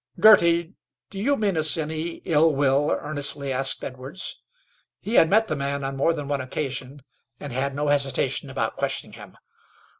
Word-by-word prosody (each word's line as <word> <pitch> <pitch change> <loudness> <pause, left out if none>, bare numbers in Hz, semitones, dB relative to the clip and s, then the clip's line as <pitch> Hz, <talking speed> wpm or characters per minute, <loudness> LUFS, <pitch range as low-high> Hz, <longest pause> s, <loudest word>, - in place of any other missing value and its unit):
"Girty, 170 -4 +5 0.4
do 195 - -7
you 275 +7 +1
mean 200 -4 0
us 155 -1 +3
any 160 +2 -4
ill 160 -2 +3
will?" 140 +1 +2
earnestly 145 -2 -2
asked 135 +1 -1
Edwards. 130 +8 -6 0.6
He 220 - -5
had 165 - +5
met 220 +2 +3
the 155 - -2
man 140 0 -3
on 135 0 -3
more 140 +5 +2
than 145 -3 -5
one 140 -1 -1
occasion, 135 0 -5 0.4
and 145 -4 -7
had 135 +2 -2
no 145 0 -1
hesitation 140 -2 0
about - - -3
questioning - - -3
him. - - -13
145 Hz, 170 wpm, -24 LUFS, 135-165 Hz, 0.6 s, Girty